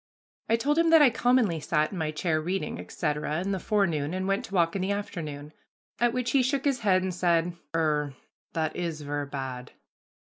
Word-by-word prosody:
I 225 Hz, -, +5 dB
told 290 Hz, +7 st, +1 dB
him 335 Hz, 0 st, +4 dB
that 325 Hz, -2 st, +7 dB
I 265 Hz, -, +6 dB
commonly 235 Hz, -7 st, +2 dB
sat 150 Hz, 0 st, 0 dB
in 190 Hz, -, -5 dB
my 155 Hz, -1 st, -1 dB
chamber 155 Hz, +1 st, 0 dB
reading, 165 Hz, -, -3 dB
etc., 150 Hz, -, -2 dB
in 195 Hz, +2 st, -2 dB
the 190 Hz, -, -1 dB
forenoon, 170 Hz, -7 st, 0 dB
and 185 Hz, 0 st, -2 dB
went 195 Hz, +1 st, 0 dB
to 195 Hz, -, -7 dB
walk 170 Hz, -1 st, +2 dB
in 195 Hz, -, -1 dB
the 190 Hz, +2 st, 0 dB
afternoon. 155 Hz, -8 st, -5 dB, 0.5 s
At 240 Hz, 0 st, +3 dB
which 250 Hz, 0 st, -1 dB
he 275 Hz, -, +4 dB
shook 270 Hz, +2 st, 0 dB
his 275 Hz, -3 st, +2 dB
head 190 Hz, -4 st, +3 dB
and 185 Hz, -1 st, -2 dB
said, 175 Hz, -1 st, +1 dB, 0.2 s
"Er, 150 Hz, -3 st, 0 dB, 0.4 s
that 160 Hz, -1 st, -1 dB
is 165 Hz, -3 st, -3 dB
ver' 145 Hz, 0 st, -3 dB
bad." 130 Hz, -3 st, -6 dB
175 Hz, 205 wpm, -27 LUFS, 150-210 Hz, 0.5 s, that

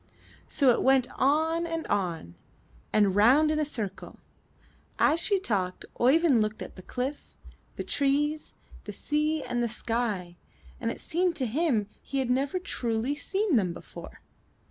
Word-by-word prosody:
So 270 Hz, -4 st, +3 dB
it -, -, +1 dB
went 265 Hz, -1 st, +4 dB
on 320 Hz, +5 st, +1 dB
and 330 Hz, -1 st, -3 dB
on, 175 Hz, -, -2 dB, 0.6 s
and 205 Hz, -3 st, +3 dB
round 265 Hz, +9 st, +5 dB
in 310 Hz, -, 0 dB
a -, -, +2 dB
circle. 215 Hz, -10 st, -5 dB, 0.8 s
As 315 Hz, +3 st, +3 dB
she 395 Hz, +3 st, +3 dB
talked 190 Hz, -, -2 dB
Oeyvind 270 Hz, -1 st, +4 dB
looked 215 Hz, 0 st, -2 dB
at -, -, -11 dB
the 185 Hz, -, -10 dB
cliff, 260 Hz, +8 st, -5 dB, 0.4 s
the -, -, -4 dB
trees, 295 Hz, +2 st, 0 dB, 0.3 s
the -, -, -6 dB
sea 300 Hz, +1 st, -1 dB
and 240 Hz, 0 st, -2 dB
the 235 Hz, -, 0 dB
sky, 220 Hz, -7 st, -3 dB, 0.4 s
and 230 Hz, -, -1 dB
it -, -, -5 dB
seemed 350 Hz, +1 st, 0 dB
to 265 Hz, -, -1 dB
him 250 Hz, -3 st, +1 dB, 0.2 s
he 275 Hz, -, -5 dB
had 260 Hz, -2 st, 0 dB
never 275 Hz, +7 st, 0 dB
truly 245 Hz, -, -1 dB
seen 385 Hz, -, 0 dB
them 185 Hz, -5 st, 0 dB
before. -, -, -11 dB
265 Hz, 155 wpm, -28 LUFS, 220-310 Hz, 0.8 s, round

